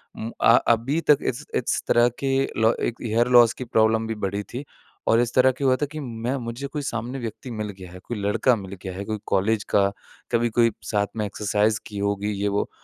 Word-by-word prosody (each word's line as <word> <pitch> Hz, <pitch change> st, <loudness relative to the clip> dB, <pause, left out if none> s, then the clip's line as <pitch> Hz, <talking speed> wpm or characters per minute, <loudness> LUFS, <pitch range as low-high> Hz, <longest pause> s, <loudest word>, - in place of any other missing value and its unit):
उम 115 Hz, +1 st, -5 dB
आ -, -, +7 dB, 0.2 s
अभी 130 Hz, +8 st, -1 dB
तक 150 Hz, -, +8 dB
इस 130 Hz, +4 st, -5 dB
इस 125 Hz, -, 0 dB
तरह 120 Hz, 0 st, +5 dB
के 135 Hz, -, -1 dB, 0.3 s
लो 110 Hz, +1 st, +5 dB
1 120 Hz, -, -2 dB
हेयर 115 Hz, +1 st, +1 dB
लॉस 120 Hz, -2 st, +6 dB
की -, -, -6 dB
प्रॉब्लम 110 Hz, -1 st, +2 dB
भी 115 Hz, -, -3 dB
बढ़ी 100 Hz, 0 st, -3 dB
थी, 125 Hz, +7 st, -7 dB, 0.4 s
और 115 Hz, -, +5 dB
इस 120 Hz, 0 st, 0 dB
तरह 130 Hz, 0 st, +6 dB
क्या 135 Hz, +2 st, -2 dB
हुआ 130 Hz, -, +5 dB
था -, -, +3 dB
कि 155 Hz, -, -6 dB
मैं 120 Hz, -1 st, -3 dB
मुझे 120 Hz, +3 st, -5 dB
कोई 145 Hz, +1 st, -4 dB
सामने 125 Hz, 0 st, -4 dB
व्यक्ति 120 Hz, +2 st, -6 dB
मिल 110 Hz, -2 st, -4 dB
गया 90 Hz, -2 st, -10 dB
है, 90 Hz, -, -10 dB
कोई 120 Hz, +4 st, -6 dB
लड़का 105 Hz, +5 st, +2 dB
मिल 100 Hz, -3 st, -8 dB
गया 95 Hz, -1 st, -6 dB
है, 95 Hz, -, -5 dB
कोई 110 Hz, 0 st, -3 dB
कॉलेज 105 Hz, +2 st, +1 dB
का, 100 Hz, -1 st, +3 dB, 0.4 s
कभी 120 Hz, 0 st, +2 dB
कोई 115 Hz, +1 st, +3 dB
साथ 105 Hz, -1 st, 0 dB
में 105 Hz, -, 0 dB
एक्सरसाइज़ 105 Hz, +1 st, 0 dB
की 105 Hz, -, -8 dB
होगी 100 Hz, +1 st, -1 dB
ये 105 Hz, -, +1 dB
वो। 100 Hz, 0 st, -1 dB
115 Hz, 230 wpm, -24 LUFS, 105-120 Hz, 0.4 s, तक